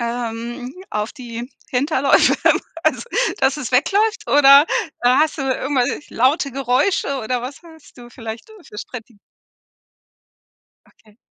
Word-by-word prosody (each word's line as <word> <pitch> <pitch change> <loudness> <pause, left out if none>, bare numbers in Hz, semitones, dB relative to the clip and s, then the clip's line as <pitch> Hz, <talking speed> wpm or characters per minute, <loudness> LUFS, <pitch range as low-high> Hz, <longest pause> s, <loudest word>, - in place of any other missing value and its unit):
ähm, 240 +2 -5 0.2
auf 210 +1 -3
die 240 -3 -8 0.2
Hinterläufe 275 +1 +3 0.5
also, - - +1 0.4
dass 265 +2 +2
es 260 -4 -6
wegläuft? 410 - +1
Oder 280 +1 +7 0.4
hast 270 +6 +3
du 275 - -2
irgendwelch 265 +1 -1
laute 275 +4 +1
Geräusche 275 +4 0
oder 245 +3 -2
was 265 +6 -8
hast 320 -3 -17
du 240 -1 -13
vielleicht 225 -1 -8 0.2
für 210 - -10
Strate 235 -1 -9 1.7
Okay. 215 -1 -26
255 Hz, 115 wpm, -20 LUFS, 240-280 Hz, 1.7 s, Oder